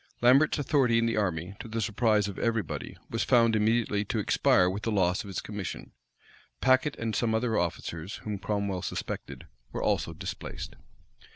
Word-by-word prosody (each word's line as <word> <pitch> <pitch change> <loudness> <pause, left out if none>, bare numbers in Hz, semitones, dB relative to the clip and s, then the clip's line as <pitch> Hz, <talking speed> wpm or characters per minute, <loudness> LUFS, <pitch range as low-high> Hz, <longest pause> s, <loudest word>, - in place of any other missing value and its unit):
Lambert's 135 +7 +5
authority 135 -5 +2
in 115 - +3
the 115 - 0
army, 90 -3 -1
to - - -7
the 115 +1 -3
surprise 110 -1 +2
of 100 - -6
every 115 -2 +1
body, 80 - -6
was - - 0
found 115 -2 +4
immediately 110 -1 +2
to - - -2
expire 90 - +3
with 95 +3 -2
the 115 - -1
loss 95 -3 +2
of - - -11
his 95 - -4
commission. 105 -3 -6 0.7
Packet 130 +3 +3
and 115 -2 -3
some 110 0 +1
other 115 0 0
officers, 85 0 -2
whom 105 -2 -4
Cromwell 100 -2 -2
suspected, - - -5 0.3
were - - -3
also - - +1
displaced. - - -6
110 Hz, 175 wpm, -28 LUFS, 100-115 Hz, 0.7 s, Lambert's